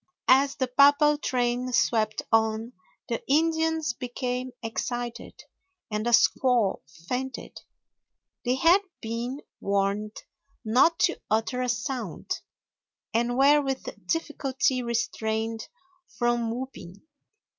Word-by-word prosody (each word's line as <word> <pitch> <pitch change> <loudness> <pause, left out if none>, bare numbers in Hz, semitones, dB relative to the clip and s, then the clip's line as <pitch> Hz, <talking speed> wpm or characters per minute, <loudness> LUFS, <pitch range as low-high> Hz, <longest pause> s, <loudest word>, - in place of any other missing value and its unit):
As 275 +1 +5
the 260 - -1
papal 285 +3 +5
train 250 -1 -1
swept 215 -2 +1
on 225 +1 +1 0.3
the 230 - -2
Indians 320 -1 +1
became 250 +1 -4
excited, 240 +1 -5 0.5
and 210 +2 -2
a - - +3
squaw 240 -3 +3 0.3
fainted. 260 +1 -4 0.8
They 250 0 +1
had 335 +8 +5 0.2
been 235 +5 -4 0.2
warned 200 +2 -1 0.5
not 255 +10 +4
to 350 - +2
utter 225 +4 0
a 250 - -1
sound, 235 - -3 0.7
and 240 +2 +1
were 285 +2 +6
with 270 -2 -3 0.2
difficulty 270 -5 0
restrained 225 -1 -2 0.4
from 240 -1 0
whooping. 225 -7 -7
245 Hz, 100 wpm, -26 LUFS, 225-270 Hz, 0.8 s, were